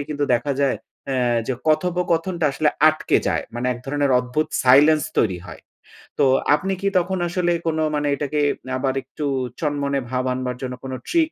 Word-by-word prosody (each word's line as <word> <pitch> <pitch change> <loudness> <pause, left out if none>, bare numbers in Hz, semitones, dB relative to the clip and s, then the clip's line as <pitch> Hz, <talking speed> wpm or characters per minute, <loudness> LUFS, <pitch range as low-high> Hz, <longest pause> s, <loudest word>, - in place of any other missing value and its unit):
কিন্তু 145 -1 -1
দেখা 130 +4 -1
যায় 140 -1 +2 0.3
এ্যা 125 -2 +1
যে 130 - -1
কথোপকথনটা 175 +1 0
আসলে 150 +2 +1 0.2
আটকে 155 0 +1
যায়। - - 0
মানে 120 +1 -2
এক 120 - -8
ধরণের 145 0 0
অদ্ভুত 125 +5 -1 0.2
সাইলেন্স 145 +4 +6 0.2
তৈরি 95 -5 0
হয়। - - -10 0.6
তো 145 - +5 0.3
আপনি 190 +5 -2
কি 200 - 0
তখন 185 +1 0
আসলে 175 0 0 0.2
কোনো 160 -1 0
মানে 145 0 0
এটাকে 145 +1 -2 0.4
আবার 130 0 0
একটু 145 +3 -6 0.3
চনমনে 145 -2 -1
ভাব 130 0 -1
আনবার 125 -1 -3
জন্য 125 -1 -4
কোন 130 - -6 0.2
ট্রিক 325 -2 +2
145 Hz, 170 wpm, -22 LUFS, 130-165 Hz, 0.6 s, সাইলেন্স